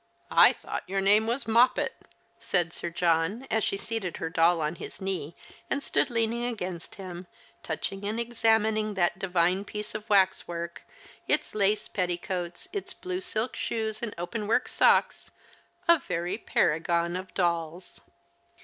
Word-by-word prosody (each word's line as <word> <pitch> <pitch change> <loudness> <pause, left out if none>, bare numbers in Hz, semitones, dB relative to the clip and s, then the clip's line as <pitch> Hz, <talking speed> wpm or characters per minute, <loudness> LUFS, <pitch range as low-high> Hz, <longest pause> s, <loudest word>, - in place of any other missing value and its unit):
I - - +8
thought - - -5
your 195 +1 0
name 205 +3 +5
was 240 +2 -1
Moppet," 235 +3 +4 0.5
said 175 -3 0
Sir 170 - -4
John, 170 +7 +1
as 220 -1 +2
she 195 - 0
seated 205 -5 -4
her 165 - -4
doll 165 +1 +4
on 155 +2 -2
his - - -8
knee 185 -5 -3 0.3
and 280 - -1
stood - - +1
leaning 230 0 0
against 185 -8 -4
him, 180 -2 -8 0.3
touching 195 0 -4
and 215 +3 -2
examining 220 -2 +1
that 175 -1 +1
divine 180 0 +1
piece 210 +1 -6
of 215 0 -6
waxwork, 175 -4 +1 0.5
its - - +1
lace 210 0 +1
petti 180 -2 -1
coats, 175 - -4
its 405 - -4
blue 365 0 -4
silk 245 -9 -3
shoes 220 -1 -2
and 235 -3 -4
open 205 +5 -4
work 240 +3 +2
socks - - +3 0.3
— - - -35
a 340 -1 +7
very 180 -4 -2
paragon 170 0 +1
of 185 +1 -5
dolls. 170 -1 -2
195 Hz, 155 wpm, -28 LUFS, 175-220 Hz, 0.5 s, I